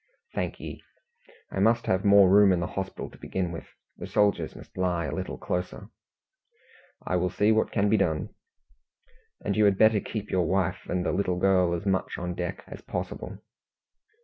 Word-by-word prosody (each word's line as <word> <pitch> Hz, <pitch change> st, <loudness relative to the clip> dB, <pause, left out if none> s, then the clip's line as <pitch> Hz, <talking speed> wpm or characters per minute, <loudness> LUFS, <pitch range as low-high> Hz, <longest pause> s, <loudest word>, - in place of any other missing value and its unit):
"Thank -, -, -3 dB
ye. -, -, -8 dB, 0.7 s
I -, -, -3 dB
must 115 Hz, +3 st, +3 dB
have 95 Hz, +1 st, +1 dB
more 100 Hz, -2 st, +7 dB
room 100 Hz, +1 st, +6 dB
in 90 Hz, -, +2 dB
the 85 Hz, -, -1 dB
hospital 95 Hz, +1 st, -5 dB
to -, -, -16 dB
begin 90 Hz, -2 st, -3 dB
with. 85 Hz, -, -7 dB, 0.3 s
The -, -, -7 dB
soldiers 100 Hz, -6 st, +1 dB
must -, -, -14 dB
lie 90 Hz, -2 st, 0 dB
a -, -, -4 dB
little 90 Hz, -8 st, -4 dB
closer." 90 Hz, +7 st, -4 dB, 1.2 s
"I -, -, -1 dB
will 90 Hz, +1 st, 0 dB
see 105 Hz, +4 st, +2 dB
what 110 Hz, 0 st, +2 dB
can 105 Hz, -1 st, +1 dB
be 110 Hz, +2 st, +3 dB
done." 80 Hz, -6 st, 0 dB, 1.2 s
"And 100 Hz, -, 0 dB
you 105 Hz, 0 st, +4 dB
had 100 Hz, -2 st, +3 dB
better 110 Hz, 0 st, +5 dB
keep 105 Hz, 0 st, -6 dB
your 90 Hz, -3 st, +1 dB
wife 95 Hz, -2 st, -1 dB
and 90 Hz, 0 st, -1 dB
the -, -, +1 dB
little 90 Hz, -2 st, 0 dB
girl 90 Hz, -2 st, +3 dB
as 85 Hz, -, -6 dB
much 95 Hz, -1 st, -1 dB
on 90 Hz, 0 st, -3 dB
deck 90 Hz, +1 st, -4 dB
as -, -, -10 dB
possible." -, -, -6 dB
95 Hz, 185 wpm, -27 LUFS, 90-100 Hz, 1.2 s, more